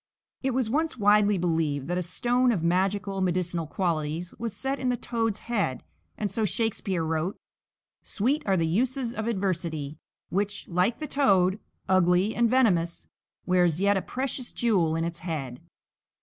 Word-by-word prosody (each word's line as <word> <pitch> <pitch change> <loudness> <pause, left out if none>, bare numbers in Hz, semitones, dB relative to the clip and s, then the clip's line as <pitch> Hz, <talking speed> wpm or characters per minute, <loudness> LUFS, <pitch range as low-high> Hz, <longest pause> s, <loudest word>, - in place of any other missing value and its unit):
It 265 -2 -1
was 255 -3 +1
once 310 +5 0
widely 205 -1 +4
believed 160 -5 0
that 175 +1 -1
a - - 0
stone 245 +7 +1
of 185 -8 -1
magical, 190 +2 0
medicinal 175 -2 0
qualities 165 0 -2
was 230 -2 -4
set 270 +1 -1
in 255 - 0
the 245 - +1
toad's 225 -3 -2
head, 205 - -1 0.3
and 205 -2 -2
so 225 - 0
Shakespeare 200 -5 -1
wrote: 160 +4 -1 0.6
"Sweet 265 +9 0
are 190 -1 +3
the 165 - +2
uses 240 - 0
of 220 0 -3
adversity; 170 -8 -2 0.3
Which, 200 +2 -2
like 185 +6 +1
the 310 - -4
toad, 195 -10 +3 0.3
ugly 185 +2 +3
and 235 -1 +2
venomous, 190 -10 +2 0.4
Wears 180 -3 +3
yet 200 +1 +3
a 190 - +1
precious 260 +1 -4
jewel 185 -9 +2
in 165 - 0
its 170 0 -3
head." 145 -8 -4
195 Hz, 160 wpm, -27 LUFS, 170-230 Hz, 0.6 s, widely